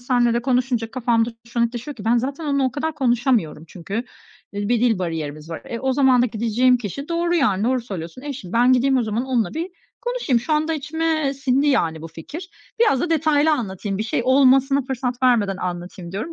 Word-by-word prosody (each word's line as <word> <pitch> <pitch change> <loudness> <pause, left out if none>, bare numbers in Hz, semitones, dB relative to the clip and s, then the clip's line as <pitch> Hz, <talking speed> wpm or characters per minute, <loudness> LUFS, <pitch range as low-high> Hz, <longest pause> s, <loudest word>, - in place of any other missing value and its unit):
seninle 245 -1 +2
de 235 - 0
konuşunca 250 -3 0
kafamda 235 -2 +1 0.2
şu 235 0 -3
netleşiyor 240 +4 -3
ki 205 - -9
ben 230 +2 +3
zaten 275 +6 -3
onunla 280 -2 +1
o 255 - 0
kadar 315 +2 -2
konuşamıyorum 240 - +1
çünkü, 180 +4 -8 0.6
eee, 205 0 -3
bir 240 -1 +2
dil 230 -5 +2
bariyerimiz 160 -3 -4
var. 165 - -6
E, 230 - -5
o 265 0 0
zaman 260 -2 +4
da 250 - +3
gideceğim 235 +3 +2
kişi 245 - -6
doğru 340 +1 0
yani 210 - +2
doğru 255 +1 +1
söylüyorsun, 190 -1 -7
eşim. 275 -11 -7
Ben 245 +2 +4
gideyim 265 +2 +3
o - - +2
zaman 220 +2 -2
onunla 250 -3 0
bir 335 +4 -3 0.3
konuşayım. 485 - 0
Şu 245 +7 -3
anda 310 +1 +1
içime 310 -1 -1
sindi 275 +1 +1
yani 165 - +1
bu 165 - -7
fikir. 295 - -9 0.3
Biraz 355 - +4
da 345 - -1
detaylı 310 -1 +3
anlatayım, 200 -7 -2
bir - - 0
şey 220 - -1
olmasına 270 +1 +4
fırsat 255 -1 -3
vermeden 220 -7 +3
anlatayım 175 0 -6
diyorum. 220 +12 -4
250 Hz, 200 wpm, -22 LUFS, 215-280 Hz, 0.6 s, zaman